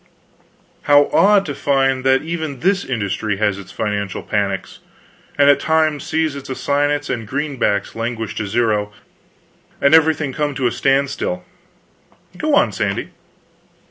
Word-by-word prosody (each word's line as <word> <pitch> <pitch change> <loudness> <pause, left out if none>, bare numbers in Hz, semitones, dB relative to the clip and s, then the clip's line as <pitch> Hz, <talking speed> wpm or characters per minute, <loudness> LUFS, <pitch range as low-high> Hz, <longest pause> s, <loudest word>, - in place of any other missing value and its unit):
"How 145 0 +5
odd 200 0 +5
to 145 - -4
find 135 -2 +1
that 135 +1 +3
even 160 -5 -4
this 195 +2 +2
industry 105 -3 -2
has 105 -1 0
its 100 - -11
financial 100 -3 -3
panics, 100 -3 -2 0.6
and 140 -1 +5
at 145 - +5
times 155 -2 +1
sees 160 -2 -1
its 140 -1 -9
assignats 145 +2 0
and 115 -3 -4
greenbacks 135 -7 -1
languish 115 -1 -3
to 110 - -2
zero, 105 -1 0 0.9
and 140 +2 +3
everything 160 -3 +3
come 145 -1 -2
to 135 - -2
a 120 - +2
standstill. 135 -11 0 0.9
Go - - 0
on, - - +3
Sandy." - - -3
135 Hz, 140 wpm, -19 LUFS, 110-145 Hz, 0.9 s, How